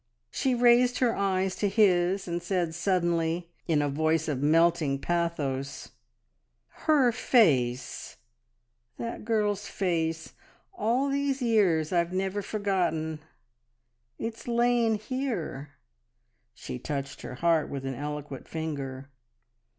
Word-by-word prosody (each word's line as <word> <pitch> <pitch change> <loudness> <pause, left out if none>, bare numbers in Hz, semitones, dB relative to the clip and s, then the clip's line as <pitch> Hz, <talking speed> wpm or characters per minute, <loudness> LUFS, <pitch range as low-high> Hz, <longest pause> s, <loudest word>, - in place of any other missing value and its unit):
She 260 -2 0
raised 245 +1 +4
her 245 -3 +2
eyes 190 -1 0
to 205 - +1
his, 190 -2 +3
and 170 0 -2
said 175 -2 -1
suddenly, 170 -1 0 0.2
in 155 -3 +2
a - - +1
voice 155 +2 +1
of 140 -4 -2
melting 160 -1 +3
pathos: 140 -4 -2 1.0
"Her 275 -6 +5
face!... 140 - +1 0.8
That 230 0 -5
girl's 210 -3 0
face! 165 -4 -2 0.4
All 255 -3 +1
these 275 -1 0
years 185 -9 +2
I've 170 0 +1
never 190 +2 -1
forgotten.... 180 -7 -1 1.0
It's 225 +1 -6
lain 235 -1 +2
here!" 210 - -4 0.8
She 125 - -7
touched 140 0 -5
her - - -7
heart 165 +2 +2
with 135 -1 -5
an 135 - -2
eloquent 145 0 -6
finger. 140 -4 -5
175 Hz, 110 wpm, -28 LUFS, 155-215 Hz, 1.0 s, Her